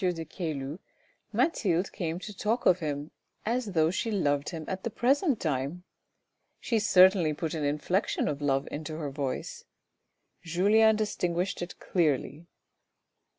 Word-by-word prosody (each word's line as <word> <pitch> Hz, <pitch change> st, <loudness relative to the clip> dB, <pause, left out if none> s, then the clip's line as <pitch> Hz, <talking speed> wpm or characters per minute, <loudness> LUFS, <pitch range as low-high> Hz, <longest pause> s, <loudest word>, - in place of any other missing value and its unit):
de 175 Hz, -3 st, -1 dB
Caylus, 155 Hz, -2 st, -4 dB, 0.5 s
Mathilde 190 Hz, -, +1 dB
came 165 Hz, -2 st, -3 dB
to 205 Hz, +3 st, -8 dB
talk 220 Hz, +5 st, -1 dB
of 180 Hz, -, +5 dB
him, 150 Hz, -2 st, -4 dB, 0.3 s
as 230 Hz, -2 st, -1 dB
though 160 Hz, -1 st, +3 dB
she 215 Hz, +5 st, -2 dB
loved 145 Hz, -9 st, 0 dB
him 160 Hz, -3 st, -6 dB
at 190 Hz, 0 st, -4 dB
the -, -, -1 dB
present 270 Hz, -, +2 dB
time. 150 Hz, +3 st, -2 dB, 0.8 s
She 230 Hz, -, 0 dB
certainly 185 Hz, -5 st, +5 dB
put 160 Hz, +1 st, -3 dB
an 155 Hz, -2 st, -2 dB
inflection 150 Hz, +8 st, 0 dB
of 145 Hz, -1 st, -2 dB
love 135 Hz, -1 st, +1 dB
into 155 Hz, +1 st, -5 dB
her 150 Hz, -3 st, -4 dB
voice. 135 Hz, -2 st, -4 dB, 0.8 s
Julien 205 Hz, +6 st, +4 dB
distinguished 185 Hz, -4 st, -1 dB
it 175 Hz, -, -6 dB
clearly. 155 Hz, -1 st, 0 dB
170 Hz, 140 wpm, -29 LUFS, 150-200 Hz, 0.8 s, of